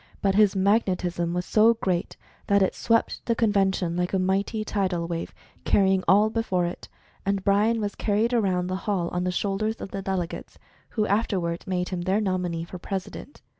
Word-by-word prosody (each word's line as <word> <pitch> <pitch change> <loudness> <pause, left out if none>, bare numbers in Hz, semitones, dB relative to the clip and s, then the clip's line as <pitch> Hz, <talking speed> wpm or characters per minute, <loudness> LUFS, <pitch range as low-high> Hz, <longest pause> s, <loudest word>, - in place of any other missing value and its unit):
But 195 -1 +1
his 205 -1 +4
"Magnetism" 185 -4 +1
was 180 0 -2
so 225 +2 +4
great 185 -5 -2 0.3
that 200 -1 +4
it 190 - +1
swept 230 -1 0
the 230 - +2
convention 195 -6 +1
like 180 +1 -1
a - - +3
mighty 195 +3 0
tidal 185 -5 -1
wave, 170 -1 -4 0.3
carrying 190 -1 +3
all 210 +3 +5
before 190 -6 0
it, 175 - -6 0.3
and 195 -1 -1
BryA 205 +3 +3
was 205 -2 -2
carried 220 +3 0
around 190 -6 +1
the 185 +1 -2
hall 180 -4 0
on 180 0 -2
the 180 - 0
shoulders 205 +4 -1
of - - -7
tipplelegates, 190 -3 -4 0.3
who 215 -2 0
after 205 -1 +1
ward 170 0 -4
made 180 -1 -1
him 180 -2 -3
their 190 +4 +1
nominee 180 -5 -1
for 175 +2 -9
President. 195 +9 -6
195 Hz, 180 wpm, -25 LUFS, 180-210 Hz, 0.3 s, all